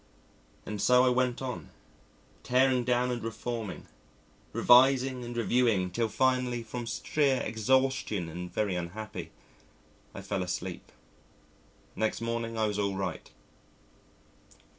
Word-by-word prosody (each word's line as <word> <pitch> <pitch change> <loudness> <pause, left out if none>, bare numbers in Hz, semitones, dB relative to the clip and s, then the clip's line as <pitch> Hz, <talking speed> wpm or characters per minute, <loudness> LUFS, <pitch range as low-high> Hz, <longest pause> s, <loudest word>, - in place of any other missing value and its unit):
And 105 -2 -4
so 125 +3 +5
I - - +5
went 125 0 0
on, 125 -2 -5 0.7
tearing 130 0 +3
down 125 +1 +1
and 120 -2 -3
reforming, 115 -2 -5 0.7
revising 130 0 +5
and 120 0 -6
reviewing, 115 -6 +2
till 115 +4 0
finally 125 0 +1
from 120 +1 -6
sheer 135 +3 +1
exhaustion 115 -4 +1
and 90 +2 -7
very 105 -3 0
unhappy 90 +5 -5 0.9
I 100 - -7
fell 100 -1 -2
asleep. 90 0 -5 1.0
Next 110 0 -1
morning 115 0 -3
I 110 - +2
was 105 -1 -1
all 100 -1 0
right. 95 0 -4
115 Hz, 120 wpm, -29 LUFS, 105-125 Hz, 1.0 s, so